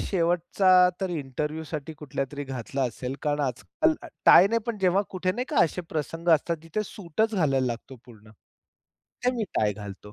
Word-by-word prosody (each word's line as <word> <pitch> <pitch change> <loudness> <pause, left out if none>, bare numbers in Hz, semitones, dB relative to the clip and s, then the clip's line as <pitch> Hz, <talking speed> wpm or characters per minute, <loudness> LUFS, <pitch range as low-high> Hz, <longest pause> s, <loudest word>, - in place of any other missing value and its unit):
शेवटचा 175 +1 +1 0.3
तर 190 -2 -1
इंटरव्ह्यूसाठी 150 +1 -4
कुठल्यातरी 140 0 -4
घातला 135 0 -4
असेल. 125 +2 -3
कारण 150 0 0
आजकाल 225 - 0 0.3
टायने 205 +5 +7
पण 230 -3 -3
जेव्हा 190 +1 +3
कुठे 185 0 -1
नाही 245 +5 -3
का, 300 - -3
असे 170 - -3
प्रसंग 165 +2 -4
असतात 165 +2 -1
तिथे 165 +6 -3
सूटच 215 +4 -1
घालायला 135 -8 +2
लागतो 125 +2 -5
पूर्ण. 110 -3 -16 0.7
तेव्हा 250 0 -3
मी 225 - 0
टाय 105 -1 +2
घालतो. 105 0 -10
155 Hz, 155 wpm, -26 LUFS, 135-185 Hz, 0.7 s, टायने